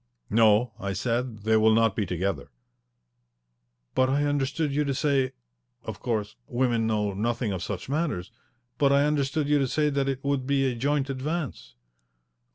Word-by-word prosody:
"No," 110 +1 +4
I 100 -3 -3
said. 115 +1 -2
"They 110 0 +3
will 110 0 +5
not 115 -3 +3
be 105 -4 -1
together." 90 -4 -2 1.4
"But 130 0 +3
I 140 +2 +2
understood 145 +1 0
you 150 +1 +2
to 140 -1 -1
say 135 -3 +1 0.5
of - - -6
course, 110 -3 -2
women 120 -2 +1
know 105 -2 0
nothing 115 +2 -1
of 95 -2 -3
such 100 -3 -5
matters, 140 - -2 0.5
but 140 -1 +4
I 140 +1 +4
understood 150 0 0
you 145 0 +3
to 135 - +1
say 150 +3 +1
that 140 -1 0
it 135 -1 -3
would 140 -2 -1
be 140 -1 +2
a 130 - +1
joint 140 +3 0
advance." 135 - -4
130 Hz, 165 wpm, -26 LUFS, 110-140 Hz, 1.4 s, will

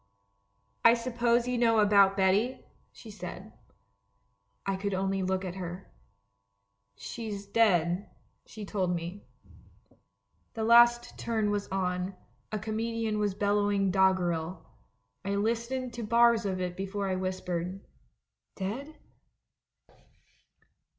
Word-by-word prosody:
" 100 +2 -44
'I 230 0 +7
suppose 235 0 +1
you 250 -1 0
know 230 -2 +4
about 200 -2 +5
Betty?' 200 +6 +1 0.3
she 220 - -12
said. 190 +1 -8 1.1
"I 195 - 0
could 195 0 -2
only 195 0 0
look 190 0 -1
at 180 - -4
her. 180 +1 -7 0.5
" 100 0 -50
'She's 210 -4 -6
dead,' 190 -4 +2 0.4
she 215 -1 -9
told 185 -3 -1
me. 170 +4 -6 1.3
*'The 225 - -2
last 240 +1 +5
turn 220 -3 0
was 205 -1 -2
on 185 0 -2 0.2
— - - -40
a 215 - -1
comedian 220 0 -2
was 205 -2 0
bel 205 0 +1
lowing 200 -2 +1
doggerel. 180 -3 +1 0.6
I 200 +1 -1
listened 235 +4 -1
to 240 - -5
bars 235 0 +4
of 185 -1 -2
it 180 -1 -3
before 195 +1 -3
I 190 - 0
whispered, 185 -1 -3 0.8
'Dead?' 250 +11 -5
200 Hz, 125 wpm, -29 LUFS, 185-225 Hz, 1.3 s, I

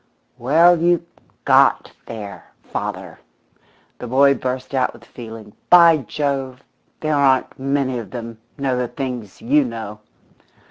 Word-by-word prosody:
"Well, 165 +7 +4
you 170 0 +2 0.4
got - - +4 0.2
there, 105 -3 -8
father!" - - -6 0.8
the 125 - -6
boy 140 +3 +4
burst 130 0 -4
out 130 -2 0
with - - -16
feeling. 110 -3 -11 0.2
"By 170 -2 +7
Jove, 135 -1 -3 0.4
there 155 -1 0
aren't 135 -2 +2
many 135 -2 -1
of 110 -5 -8
them 115 0 -8 0.2
know 135 -2 -1
the 125 0 -1
things 120 -5 -6
you 145 +5 +3
know!" 110 -4 -7
130 Hz, 130 wpm, -20 LUFS, 115-140 Hz, 0.8 s, By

